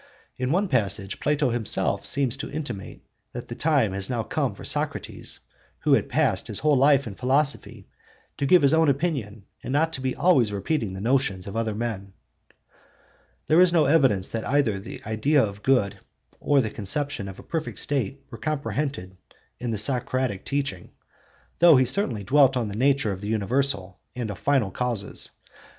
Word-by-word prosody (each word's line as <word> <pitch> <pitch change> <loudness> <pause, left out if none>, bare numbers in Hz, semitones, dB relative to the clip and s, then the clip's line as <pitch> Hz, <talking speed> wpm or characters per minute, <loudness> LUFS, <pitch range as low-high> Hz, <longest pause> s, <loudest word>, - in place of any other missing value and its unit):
In 130 +1 -2
one 195 +5 +1
passage 100 - -1
Plato 145 -3 +1
himself 115 -2 +1
seems 135 -3 +1
to - - -6
intimate 140 -10 -6 0.3
that - - -7
the - - -4
time 140 -11 +1
had 95 +2 -2
now 120 -3 -1
come - - -2
for - - -10
Socrates, - - -2 0.4
who - - +3
had - - +2
passed - - +1
his - - -2
whole 150 0 +2
life 140 +1 +4
in 110 - -6
philosophy, 130 -4 -1 0.5
to 140 - 0
give 180 0 +5
his 140 +2 +5
own 160 -1 +4
opinion 135 - -2 0.2
and 125 - -6
not 160 +4 +1
to 130 - -4
be 130 -1 -2
always 135 - +3
repeating 105 +1 -2
the 95 - -7
notions 115 -6 0
of 100 - -7
other 110 -2 -1
men. 105 -4 -4 1.3
There 155 +2 +4
is 180 -1 +5
no 165 -3 +3
evidence 135 - +3
that 115 -1 -4
either 125 -8 +1
the 95 - -10
idea 120 +7 +2
of 100 -1 -8
good 105 -7 +1 0.4
or 145 -2 +3
the 110 -3 -3
conception 115 +1 -2
of 95 - -9
a - - -12
perfect 160 -2 -4
state 140 -1 -2
were 115 - -9
comprehended 140 -10 -3 0.4
in 120 0 -4
the 110 - -1
Socratic 125 -1 +1
teaching, 140 -11 -3 0.7
though 170 -4 +7
he 130 - +4
certainly 125 - -1
dwelt 135 +4 +4
on 115 -4 -1
the 100 - -6
nature 135 -2 +2
of 95 0 -6
the 105 - -5
universal 110 -3 -1 0.2
and 120 -4 -3
of 90 - -9
final 135 -9 +1
causes 115 -2 -1
(cp. - - -28
125 Hz, 180 wpm, -25 LUFS, 105-145 Hz, 1.3 s, though